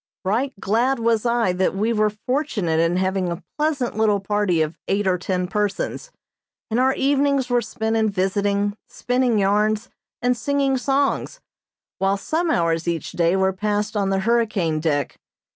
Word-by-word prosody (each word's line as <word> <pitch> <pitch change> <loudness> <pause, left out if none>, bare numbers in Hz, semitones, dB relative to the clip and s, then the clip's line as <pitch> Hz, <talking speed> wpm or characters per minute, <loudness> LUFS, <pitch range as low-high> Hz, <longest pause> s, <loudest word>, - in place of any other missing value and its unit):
Right 235 +8 0
glad 240 +8 +1
was 230 0 +1
I 235 -6 +2
that 185 +1 0
we 220 +4 +1
were 215 -1 +2
fortunate 210 - -1
in 165 +2 +2
having 185 -1 0
a 170 +2 -6 0.2
pleasant 295 -7 0
little 215 -2 +2
party 195 -4 +1
of 155 +1 -4
eight 200 +1 0
or 185 -1 +1
ten 180 0 -1
persons, 210 - -2 0.6
and 225 - +1
our 265 +1 +3
evenings 275 -2 +1
were 245 0 +3
spent 220 0 -2
in 220 -1 +2
visiting, 200 +1 0
spinning 245 -2 0
yarns, 210 +2 +1 0.3
and 245 0 +1
singing 275 +3 0
songs, 275 - 0 0.6
while 195 +1 +1
some 325 - -1
hours 165 - +1
each 170 -2 -2
day 170 +1 +2
were 190 0 +2
passed 210 +2 -2
on 200 -2 +1
the 195 0 +1
hurricane 210 -8 +1
deck. 145 -3 -1
210 Hz, 160 wpm, -22 LUFS, 190-245 Hz, 0.6 s, our